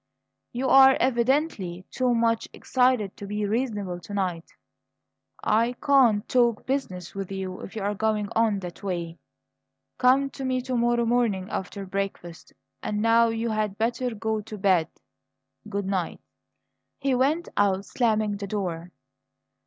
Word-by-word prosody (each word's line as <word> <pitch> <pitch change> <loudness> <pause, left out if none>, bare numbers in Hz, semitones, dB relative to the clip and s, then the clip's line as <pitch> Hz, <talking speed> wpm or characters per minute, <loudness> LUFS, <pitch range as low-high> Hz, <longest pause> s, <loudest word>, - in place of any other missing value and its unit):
"You 255 +2 -2
are 270 0 +8
evidently 240 - 0
too 250 -1 +1
much 230 -1 +1
excited 250 -6 +1
to 200 - -7
be 210 +1 -2
reasonable 205 -5 -2
to 205 +3 -8
night. 180 -4 -2 1.0
I 230 +3 +2
can't 250 -6 +3
talk 235 -3 +2
business 190 -10 -3
with 195 -1 -5
you 190 -1 -4
if - - -9
you're 205 -1 -1
going 210 0 0
on 220 -3 +2
that 175 -2 -8
way. 170 -4 -4 0.8
Come 270 +2 +4
to 270 - -7
me 260 -1 0
to 255 0 -3
morrow 240 0 +2
morning 225 -5 0
after 195 +1 -4
breakfast. 190 -3 -5 0.3
And 210 - -2
now 230 +1 +5
you 225 0 -1
had 215 -2 -1
better 235 +1 -1
go 220 0 -2
to 215 0 -9
bed. 185 -5 +3 0.8
Good 200 -1 -2
night." 190 -3 -2 0.8
He 275 -1 0
went 285 +7 +1
out, 195 -1 +2
slamming 215 -4 0
the 200 0 -5
door. 180 -4 -4
215 Hz, 145 wpm, -26 LUFS, 195-245 Hz, 1.0 s, are